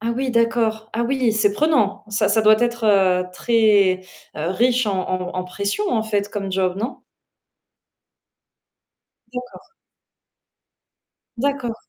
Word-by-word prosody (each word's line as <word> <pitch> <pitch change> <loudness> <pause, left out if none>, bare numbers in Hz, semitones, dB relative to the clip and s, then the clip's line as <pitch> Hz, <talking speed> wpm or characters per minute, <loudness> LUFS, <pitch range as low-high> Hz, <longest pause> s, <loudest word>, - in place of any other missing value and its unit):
Ah 230 +1 -2
oui, 260 +1 -2
d'accord. 230 -2 0
Ah 235 +2 -1
oui, 250 -2 +1
c'est 210 -2 +2
prenant. 225 -7 +1
Ça 210 -1 0
ça 220 +1 +2
doit 215 0 +6
être, 235 -1 -1
heu, 185 -3 +3
très 205 -4 +3 0.3
riche 230 +10 +1
en 195 -2 -1
en 185 -1 -3
en 185 - -2
pression, 200 - -3
en 220 -2 +1
fait, 205 -2 -1
comme 195 -2 -4
job, 185 -1 0
non? 230 +6 -4 2.3
D'accord. 250 - -9 1.7
D'accord. 270 -3 -1
220 Hz, 125 wpm, -21 LUFS, 195-235 Hz, 2.3 s, doit